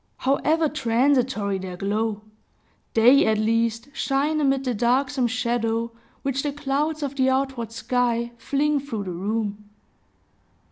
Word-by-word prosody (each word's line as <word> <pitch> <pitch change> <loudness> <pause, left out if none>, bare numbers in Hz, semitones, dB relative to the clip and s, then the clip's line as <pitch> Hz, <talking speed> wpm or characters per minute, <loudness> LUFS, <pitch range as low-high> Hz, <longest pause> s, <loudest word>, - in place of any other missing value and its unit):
However 310 +4 +2
transitory 245 -6 +1
their 185 -1 -6
glow, 210 +2 -2 0.7
they 245 +5 +6
at 220 0 +2
least 230 +3 0
shine 290 +3 0
amid 270 -1 +2
the 255 -2 -1
darksome 255 +3 +1
shadow 235 -1 -1 0.3
which 275 0 -1
the 290 - -2
clouds 295 +2 -2
of 280 -1 -3
the 260 0 +3
outward 260 -4 -1
sky 235 0 0
fling 290 +3 +1
through 260 -7 -5
the 185 - -5
room. 205 +3 -3
245 Hz, 130 wpm, -24 LUFS, 225-275 Hz, 0.7 s, they